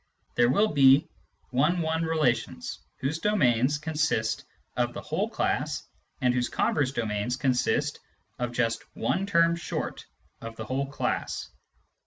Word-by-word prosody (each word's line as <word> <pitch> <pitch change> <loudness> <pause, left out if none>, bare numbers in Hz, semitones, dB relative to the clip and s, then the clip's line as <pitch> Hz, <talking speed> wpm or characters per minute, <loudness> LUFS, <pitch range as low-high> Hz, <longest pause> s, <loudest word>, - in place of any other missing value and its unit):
there 120 0 +4
will 205 +11 +3
be 140 +1 +6 0.4
one 150 +8 +2
one 160 0 0
relations 150 -8 0 0.2
whose 150 +5 -1
domains 140 - +3
consist 150 -8 0 0.3
of - - 0
the - - -4
whole - - -1
class - - -1 0.4
and 125 -1 +3
whose 125 -1 0
converse 140 -4 +1
domains 110 -1 -1
consist 130 -3 +1 0.4
of 120 -1 -1
just 120 -1 0
one 190 +8 0
term 170 -3 +4
short 170 - -4 0.3
of 115 0 -7
the 110 - -6
whole 135 +4 -1
class. 140 - -3
135 Hz, 135 wpm, -27 LUFS, 120-160 Hz, 0.4 s, be